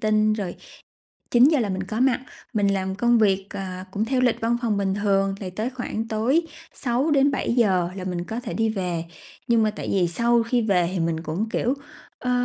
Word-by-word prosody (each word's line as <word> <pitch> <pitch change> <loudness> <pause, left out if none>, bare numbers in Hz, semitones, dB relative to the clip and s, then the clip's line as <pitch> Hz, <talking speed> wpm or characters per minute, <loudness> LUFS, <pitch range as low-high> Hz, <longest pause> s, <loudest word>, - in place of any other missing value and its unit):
tinh, 215 0 +3
rồi 200 -5 -3 0.8
9:00 265 +5 +5
là 210 - 0
mình 190 0 -2
có 215 +4 -4
mặt. 255 -1 +3 0.3
Mình 205 -3 +2
làm 190 -1 -1
công 240 +3 +3
việc, 195 -2 +2
à, 185 -2 -5
cũng 210 +2 -1
theo 260 0 +1
lịch 245 -2 +2
văn 235 +1 +1
phòng 215 -3 +1
bình 195 -1 0
thường, 195 -1 +1
thì 185 - -5
tới 215 +7 -3
khoảng 225 -3 -4
tối 240 +10 +2 0.3
6:00-7:00 245 - +2
là 185 - -5
mình 175 -1 -3
có 225 +6 -4
thể - - -6
đi 225 0 +1
về. 180 -5 -2 0.4
Nhưng 230 -2 +4
mà 215 - +2
tại - - -5
vì 180 -3 +2
sau 235 +5 +2
khi 235 +1 +1
về 180 -5 +2
thì 185 - -2
mình 165 -1 -1
cũng, 175 +8 -2
kiểu, 245 +3 0 0.4
ơ, 250 - -2
215 Hz, 200 wpm, -24 LUFS, 190-240 Hz, 0.8 s, 9:00